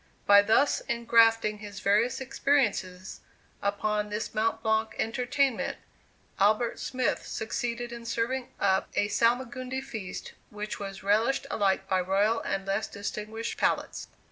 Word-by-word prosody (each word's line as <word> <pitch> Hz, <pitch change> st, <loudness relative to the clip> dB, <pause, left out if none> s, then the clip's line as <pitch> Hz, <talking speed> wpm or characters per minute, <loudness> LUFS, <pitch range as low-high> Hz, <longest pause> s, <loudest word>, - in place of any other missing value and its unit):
By 200 Hz, 0 st, +8 dB
thus 225 Hz, +7 st, +3 dB
engrafting 225 Hz, -2 st, +3 dB
his 205 Hz, -2 st, -8 dB
various 215 Hz, +5 st, +2 dB
experiences 210 Hz, -9 st, 0 dB, 0.4 s
upon 210 Hz, +1 st, -1 dB
this 210 Hz, +1 st, -4 dB
Mont 225 Hz, +1 st, 0 dB
Blanc 220 Hz, 0 st, +1 dB
entertainment, 250 Hz, +2 st, 0 dB, 0.6 s
Albert 215 Hz, +4 st, +2 dB
Smith 255 Hz, -2 st, -1 dB
succeeded 235 Hz, +2 st, -3 dB
in 235 Hz, -1 st, -8 dB
serving 245 Hz, +3 st, -2 dB
up 190 Hz, -1 st, +2 dB
a 205 Hz, -, +1 dB
salmagundi 250 Hz, +3 st, 0 dB
feast, 220 Hz, -9 st, -7 dB, 0.2 s
which 210 Hz, 0 st, -6 dB
was 195 Hz, -1 st, -7 dB
relished 220 Hz, +8 st, +2 dB
alike 195 Hz, -2 st, +1 dB
by 185 Hz, -1 st, +2 dB
royal 200 Hz, +5 st, +2 dB
and 195 Hz, 0 st, -3 dB
less 195 Hz, +2 st, -1 dB
distinguished 210 Hz, +2 st, -5 dB
palates. -, -, 0 dB
220 Hz, 125 wpm, -28 LUFS, 200-235 Hz, 0.6 s, By